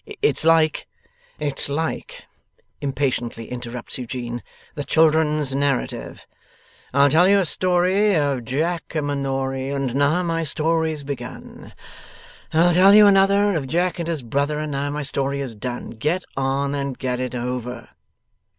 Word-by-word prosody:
It's 435 - +2
like 160 -1 +3 0.3
' - - -34
'It's 145 -1 -1
like,' 160 +3 -4 0.6
impatiently 130 -5 -2
interrupts 125 0 -6
Eugene, 120 -1 -5 0.3
'the 145 - -5
children's 155 -2 +3
narrative: 140 -1 -2 0.7
"I'll 140 +1 +4
tell 175 +4 +5
you 200 +1 +5
a 195 - +2
story 185 +4 +2
Of 140 -5 0
Jack 165 +7 -2
a 155 - +1
Manory, 135 -2 -2
And 135 -3 -2
now 145 +6 +2
my 165 -1 -1
story's 160 0 -1
begun; 125 -3 -8 0.8
I'll 170 +2 +4
tell 190 +3 +7
you 210 0 +9
another 200 +1 +4
Of 150 -6 -2
Jack 175 +5 0
and 170 - -3
his 160 -6 -3
brother, 140 +5 -1
And 155 0 -3
now 140 +1 -2
my 150 +1 -3
story 140 0 -2
is 135 -4 -4
done." 120 +3 -6
Get 150 +11 -1
on, 135 +1 -1
and 140 -2 -3
get 125 -2 -2
it 125 -1 -3
over! 125 -1 -4
145 Hz, 150 wpm, -22 LUFS, 130-165 Hz, 0.8 s, you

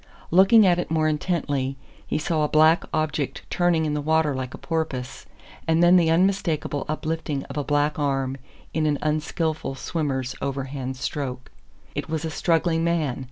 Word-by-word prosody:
Looking 195 +5 +7
at 175 -1 +4
it - - -3
more 155 -1 +2
intently, 145 -4 -1 0.3
he - - -1
saw 155 0 0
a - - +2
black 155 +2 +4
object 155 -3 -2
turning 175 -3 +2
in 150 - -1
the 150 - -1
water 160 0 +2
like 130 -1 -4
a - - -10
porpoise, 155 -7 -4 0.4
and 165 +1 +3
then 175 +1 +7
the 170 -3 +4
unmistakable 165 -5 +1
uplifting 155 -2 -2
of 140 - -9
a 145 - -1
black 145 +1 +1
arm 135 -2 0 0.4
in 155 -1 +1
an 145 -1 +1
unskillful 155 -1 -1
swimmer's 135 -2 -2
overhand 135 -1 -4
stroke. 125 - -4 0.4
It - - -4
was 160 0 -2
a 160 - -3
struggling 165 +1 +1
man. 160 -6 0
155 Hz, 165 wpm, -24 LUFS, 140-165 Hz, 0.4 s, Looking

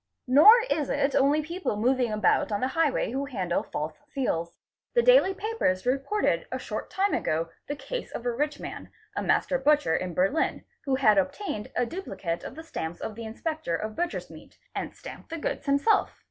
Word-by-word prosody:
Nor 315 - +8
is 300 - 0
it 275 - +1
only 290 +3 +3
people 340 - -3
moving 245 +1 +2
about 215 +1 +2
on 205 - 0
the 255 - 0
highway 315 -6 +1
who 270 +2 -2
handle 185 -11 -1
false 155 +1 -4 0.2
seals. 170 -11 -2 0.4
The 475 - +5
daily - - +6
papers 390 - -1
reported 275 +11 0
a - - -1
short - - -5
time 390 +1 0
ago 165 +1 0 0.2
the 290 - -3
case - - -5
of 235 - -6
a 245 - +1
rich 290 +4 -2
man, - - -7 0.3
2 - - -1
master 270 - +1
butcher 295 - +3
in 180 -2 -3
Berlin, 195 - +1 0.2
who 270 -2 +2
had 260 -2 +5
obtained 280 - -3
a 245 - +2
duplicate 195 - -4
of - - -7
the 320 - -8
stamps 170 - -5
of 220 - -5
the 230 +2 -7
inspector 270 - -3
of 215 +5 -4
butcher's 350 0 -3
meat, - - -14 0.2
and - - -4
stamped - - -10
the 330 - -4
goods 300 - -3
himself. 280 +11 +2
275 Hz, 190 wpm, -27 LUFS, 215-320 Hz, 0.4 s, Nor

